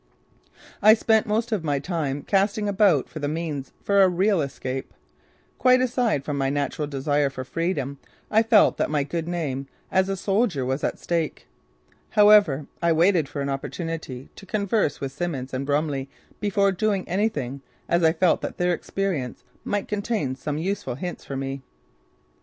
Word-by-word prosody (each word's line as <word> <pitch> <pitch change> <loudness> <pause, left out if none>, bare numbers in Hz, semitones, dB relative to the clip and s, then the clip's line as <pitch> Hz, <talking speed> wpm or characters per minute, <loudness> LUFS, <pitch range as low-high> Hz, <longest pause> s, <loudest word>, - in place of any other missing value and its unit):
I 215 +1 +8
spent 220 -1 +2
most 225 +3 0
of 205 -6 0
my 145 -3 0
time 145 -3 -2
casting 205 +1 +1
about 195 -8 +3
for 155 - -8
the 145 - -2
means 150 -3 -3
for 200 -1 +4
a 190 - +6
real 185 +1 +2
escape. 130 -1 -5 0.6
Quite 255 0 +5
aside 245 - +1
from 145 -2 -2
my 135 0 +1
natural 145 +1 -1
desire 145 0 0
for 130 -1 -6
freedom 140 -2 -2 0.3
I 220 - +5
felt 225 -2 +4
that - - 0
my 150 -2 +1
good 165 +3 -4
name 145 -6 -3 0.2
as 190 +1 +2
a 195 - -1
soldier 195 - +1
was 130 +3 -2
at - - -1
stake. 165 -2 -2 0.6
However, 205 - +5 0.2
I 170 0 +3
waited 165 -2 +3
for 140 - -4
an 140 - -2
opportunity 140 -1 -5
to 195 - -12
converse 200 -5 0
with 135 -1 -4
Simmons 135 -4 -4
and 135 +1 -3
Brumley 145 -2 0 0.3
before 200 -1 +2
doing 200 0 0
anything 150 - -1 0.3
as 170 +1 +2
I 160 - +6
felt 170 +1 +2
that - - -5
their 180 0 +2
experience 170 -8 -3 0.2
might 205 -1 -2
contain 210 - -1
some 145 +3 -4
useful 185 -4 -2
hints 175 +6 -6
for 135 - -5
me. 135 0 -4
165 Hz, 170 wpm, -24 LUFS, 140-200 Hz, 0.6 s, I